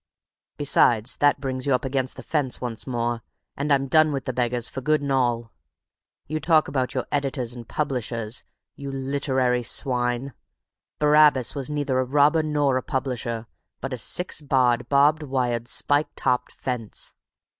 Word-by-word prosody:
Besides, 120 Hz, -5 st, +3 dB
that 145 Hz, -1 st, +3 dB
brings 130 Hz, -1 st, -4 dB
you 135 Hz, -, +4 dB
up 130 Hz, -, -3 dB
against 130 Hz, -1 st, -1 dB
the -, -, -8 dB
Fence 145 Hz, -5 st, 0 dB
once 120 Hz, -1 st, -5 dB
more, 120 Hz, -2 st, -2 dB, 0.3 s
and 145 Hz, +2 st, -2 dB
I'm 135 Hz, -1 st, +3 dB
done 155 Hz, +2 st, +4 dB
with 135 Hz, -2 st, -3 dB
the 130 Hz, -, -2 dB
beggars 120 Hz, -1 st, 0 dB
for 135 Hz, -, -6 dB
good 155 Hz, +3 st, +2 dB
and 140 Hz, -1 st, -3 dB
all. 120 Hz, -3 st, 0 dB, 0.7 s
You 155 Hz, +1 st, -3 dB
talk 160 Hz, 0 st, +3 dB
about 130 Hz, -2 st, -2 dB
your 130 Hz, -, -1 dB
editors 135 Hz, -4 st, -1 dB
and 120 Hz, -2 st, -9 dB
publishers, 120 Hz, -6 st, -3 dB, 0.3 s
you 140 Hz, -1 st, -6 dB
literary 130 Hz, -2 st, 0 dB
swine. 125 Hz, +1 st, -1 dB, 0.6 s
Barabbas 150 Hz, -4 st, +4 dB
was 140 Hz, -1 st, -3 dB
neither 145 Hz, -3 st, -1 dB
a -, -, +2 dB
robber 145 Hz, +4 st, +3 dB
nor 145 Hz, -4 st, +1 dB
a -, -, -1 dB
publisher, 120 Hz, -4 st, -3 dB, 0.3 s
but 135 Hz, -, -5 dB
a -, -, -3 dB
six 180 Hz, -, +1 dB
barred, 130 Hz, -4 st, +1 dB
barbed 145 Hz, +2 st, +4 dB
wired, 125 Hz, -4 st, -1 dB
spike 145 Hz, +4 st, +1 dB
topped 125 Hz, -1 st, 0 dB
Fence. 125 Hz, -4 st, -4 dB
130 Hz, 160 wpm, -24 LUFS, 125-145 Hz, 0.7 s, you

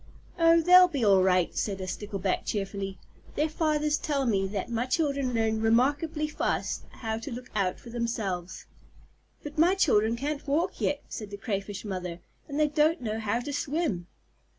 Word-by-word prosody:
"Oh, 330 Hz, 0 st, +6 dB
they'll 360 Hz, +2 st, +8 dB
be 280 Hz, -9 st, -1 dB
all 195 Hz, -2 st, +6 dB
right," 185 Hz, -2 st, +2 dB
said 195 Hz, -2 st, -2 dB
a 185 Hz, -, -4 dB
Stickleback 195 Hz, 0 st, -2 dB
cheerfully. 195 Hz, -1 st, -3 dB, 0.4 s
"Their 300 Hz, -, +2 dB
fathers 300 Hz, -1 st, +1 dB
tell 280 Hz, -3 st, -1 dB
me 195 Hz, -5 st, +1 dB
that 200 Hz, +3 st, -4 dB
my 235 Hz, +2 st, -1 dB
children 280 Hz, -2 st, 0 dB
learn 220 Hz, -1 st, +1 dB
remarkably 290 Hz, +7 st, +2 dB
fast 300 Hz, -, -2 dB
how 220 Hz, -1 st, -4 dB
to 230 Hz, -, -7 dB
look 250 Hz, +2 st, -8 dB
out 190 Hz, -3 st, 0 dB
for 235 Hz, -, -11 dB
themselves." 215 Hz, -7 st, -3 dB, 0.8 s
"But 295 Hz, +1 st, -6 dB
my 350 Hz, +4 st, +5 dB
children 230 Hz, -, +3 dB
can't 285 Hz, +4 st, -4 dB
walk 330 Hz, +7 st, 0 dB
yet," 285 Hz, -, 0 dB
said 210 Hz, -2 st, -6 dB
the 200 Hz, -, -7 dB
Crayfish 200 Hz, -1 st, -4 dB
Mother, 180 Hz, -3 st, -4 dB, 0.3 s
"and 285 Hz, +1 st, -3 dB
they 305 Hz, -, +4 dB
don't 305 Hz, +2 st, +2 dB
know 220 Hz, -1 st, -2 dB
how 225 Hz, +2 st, -1 dB
to 285 Hz, +3 st, -5 dB
swim." 280 Hz, -, -1 dB
235 Hz, 175 wpm, -28 LUFS, 200-300 Hz, 0.8 s, they'll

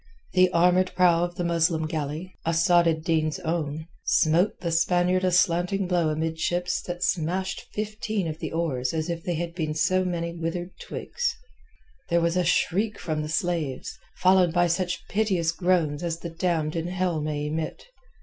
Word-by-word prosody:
The 185 Hz, 0 st, +5 dB
armoured 180 Hz, +2 st, +3 dB
prow 175 Hz, -2 st, +4 dB
of 175 Hz, 0 st, -3 dB
the 175 Hz, -, -2 dB
Muslim 165 Hz, -1 st, +1 dB
galley—Asad 165 Hz, +2 st, +1 dB
ed 160 Hz, -1 st, 0 dB
Din's 160 Hz, -2 st, +1 dB
own—smote 160 Hz, +2 st, 0 dB
the 170 Hz, -, -2 dB
Spaniard 175 Hz, +2 st, +2 dB
a 185 Hz, -, +3 dB
slanting 180 Hz, +2 st, +2 dB
blow 175 Hz, -3 st, +2 dB
amidships 160 Hz, +3 st, -1 dB
that 175 Hz, 0 st, -4 dB
smashed 180 Hz, +3 st, -1 dB
fifteen 215 Hz, -2 st, -2 dB
of 155 Hz, 0 st, -5 dB
the -, -, -4 dB
oars 155 Hz, -5 st, -1 dB
as 160 Hz, +2 st, -1 dB
if 170 Hz, -1 st, -4 dB
they 175 Hz, -, -1 dB
had 170 Hz, +1 st, -3 dB
been 155 Hz, -3 st, -2 dB
so 185 Hz, +4 st, +2 dB
many 170 Hz, -2 st, -2 dB
withered 170 Hz, +2 st, -4 dB
twigs. 480 Hz, -1 st, -3 dB, 0.7 s
There 170 Hz, -1 st, +3 dB
was 170 Hz, 0 st, +1 dB
a 180 Hz, -, +2 dB
shriek 200 Hz, +5 st, +1 dB
from 155 Hz, -2 st, -2 dB
the 150 Hz, -, -4 dB
slaves, 160 Hz, -4 st, -2 dB, 0.2 s
followed 185 Hz, -2 st, +4 dB
by 175 Hz, 0 st, +4 dB
such 180 Hz, +1 st, -1 dB
piteous 190 Hz, -6 st, +1 dB
groans 165 Hz, -4 st, +1 dB
as 170 Hz, -2 st, -2 dB
the 170 Hz, 0 st, -7 dB
damned 165 Hz, -2 st, -1 dB
in 165 Hz, 0 st, -2 dB
hell 180 Hz, -3 st, -1 dB
may 150 Hz, -1 st, -2 dB
emit. 155 Hz, +1 st, -4 dB
170 Hz, 165 wpm, -26 LUFS, 160-180 Hz, 0.7 s, The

